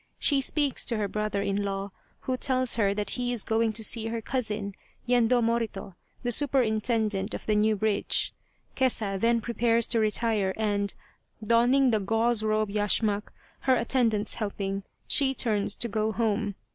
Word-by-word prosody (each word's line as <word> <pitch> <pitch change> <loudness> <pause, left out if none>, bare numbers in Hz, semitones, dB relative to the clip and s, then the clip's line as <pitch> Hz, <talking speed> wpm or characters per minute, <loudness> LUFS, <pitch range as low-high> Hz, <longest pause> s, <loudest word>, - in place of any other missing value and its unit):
She 280 -2 +2
speaks 285 0 +1
to 230 - 0
her 210 -1 -1
brother 210 0 -2
in 200 0 -1
law, 195 0 -4 0.3
who 260 - -2
tells 255 -1 +1
her 200 -3 +2
that 205 -1 -3
he 245 -1 -2
is 240 -4 0
going 225 0 +1
to 220 +1 -1
see 225 +1 +2
her 230 0 -3
cousin, 215 -4 -3 0.3
Yendo 245 0 +3
Morito, 230 -4 -2 0.3
the 245 - -1
superintendent 220 -6 +1
of - - -8
the 215 - +1
new 215 +1 +2
bridge. 210 0 0 0.4
Kesa 220 -7 0
then 230 +2 +2
prepares 235 0 +1
to 235 - +2
retire 215 -3 +1
and, 205 -2 -1 0.5
donning 245 +4 +3
the 220 - +2
gauze 225 +3 +1
robe 215 -1 0
yash 210 +2 +1
mak, 210 -1 -1 0.3
her 260 -1 +2
attendants 230 -3 +1
helping, 200 -2 -3 0.3
she 270 -2 +4
turns 215 -6 +1
to 235 - -1
go 215 0 -1
home. 210 -2 -1
220 Hz, 165 wpm, -27 LUFS, 210-235 Hz, 0.5 s, she